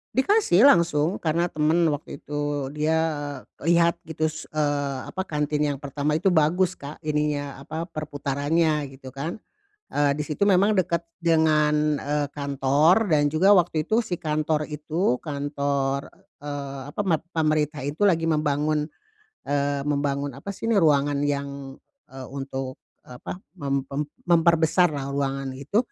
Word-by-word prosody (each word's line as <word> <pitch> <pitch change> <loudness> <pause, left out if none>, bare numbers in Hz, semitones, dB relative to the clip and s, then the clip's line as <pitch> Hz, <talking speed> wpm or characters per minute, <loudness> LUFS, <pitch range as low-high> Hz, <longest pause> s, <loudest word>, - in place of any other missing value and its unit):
Dikasih 270 - +4
langsung 170 - +3
karena 170 +1 +1
temen 155 +3 +2
waktu 145 - -6
itu 145 -2 -3
dia, 155 +2 +1 0.6
eee, - - -8
lihat 170 0 +4
gitu 160 -1 -3
se 155 0 -4
eee, 145 -3 -1
apa 190 - -4
kantin 150 -3 -1
yang 140 - -2
pertama 145 +2 -1
itu 185 +3 +2
bagus, 175 +4 +3
Kak, 145 -1 -9
ininya 150 -2 -1
apa, 160 +4 -5
perputarannya, 150 -1 -1
gitu 130 -1 -12
kan. 155 +8 -4 0.5
Eee, 145 -1 +2
di 150 - -5
situ 150 +5 -1
memang 200 +2 +4
dekat 175 -3 +1 0.2
dengan, 150 -2 +3
eee, 145 0 -1
kantor 145 +8 +3
dan 145 -3 +2
juga 190 +6 +5
waktu 170 -3 +2
itu 225 +2 +2
si 175 -5 -4
kantor 155 0 -1
itu, 150 -1 -1
kantor, 140 -2 -2 0.3
eee, 140 -2 -5
apa, - - -4
mat 170 -6 0
pemerintah 155 -2 +1
itu 145 +8 -1
lagi 165 -5 +3
membangun, 150 0 0 0.6
eee, 140 0 0
membangun 140 -1 -1
apa 200 +9 -6
sih 225 +3 -5
ini, 230 - +3
ruangan 145 -5 +3
yang, 140 -1 -4 0.3
eee, 130 -1 -8
untuk 135 -1 -5 0.3
apa 125 +8 -8 0.2
mem 140 -5 -2
mem 140 +2 -2 0.2
memperbesarlah 165 -4 +3
ruangan 135 -1 -2
itu, 140 +10 -1
150 Hz, 145 wpm, -25 LUFS, 140-165 Hz, 0.6 s, juga